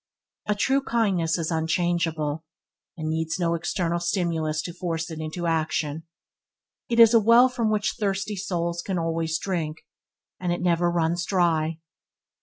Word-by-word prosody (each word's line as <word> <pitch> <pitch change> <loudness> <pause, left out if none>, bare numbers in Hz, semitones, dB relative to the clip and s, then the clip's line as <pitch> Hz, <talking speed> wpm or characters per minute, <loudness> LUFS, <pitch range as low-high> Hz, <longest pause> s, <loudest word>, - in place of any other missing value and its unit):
A 210 - +1
true 270 +6 +2
kindness 195 -11 +1
is 165 0 -2
unchangeable, 160 -2 0 0.5
and 155 -1 -4
needs 160 +1 -1
no 170 -2 +1
external 170 0 -1
stimulus 165 -3 -1
to 175 - -6
force 165 -2 -3
it 160 - -6
into 155 +3 -4
action. 160 -1 -1 0.8
It 235 -1 +1
is 230 0 +8
a 230 - +7
well 230 +4 +6
from 240 -3 -1
which 210 -1 0
thirsty 200 0 -1
souls 170 -3 -2
can 190 +1 -3
always 165 -1 -1
drink, 165 -5 -3 0.5
and 180 -1 -1
it 175 - -1
never 175 0 +2
runs 170 0 0
dry. 165 -4 +1
170 Hz, 150 wpm, -25 LUFS, 160-190 Hz, 0.8 s, is